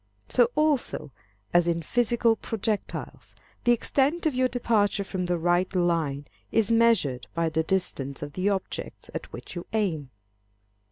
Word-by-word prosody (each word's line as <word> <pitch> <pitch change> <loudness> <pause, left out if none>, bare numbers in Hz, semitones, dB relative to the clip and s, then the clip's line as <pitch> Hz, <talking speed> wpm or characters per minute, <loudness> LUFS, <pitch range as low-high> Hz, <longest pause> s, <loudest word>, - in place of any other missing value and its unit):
So 240 -1 +4
also, 300 - +1 0.4
as 175 0 +4
in 170 -1 0
physical 235 +3 +2
projectiles, 220 -1 -4 0.3
the 240 - +5
extent 280 +7 +1
of 310 - +2
your 255 0 +2
departure 215 -5 +1
from 185 -2 -3
the 175 0 +1
right 175 +2 +1
line 165 -5 +1 0.3
is 225 0 +2
measured 225 - +3
by 165 -1 +1
the 160 0 +1
distance 155 -6 -1
of 145 -1 -7
the 185 +4 +1
objects 195 -2 -4
at - - -6
which - - -9
you 175 - -6
aim. 170 -11 0
190 Hz, 150 wpm, -26 LUFS, 165-235 Hz, 0.4 s, the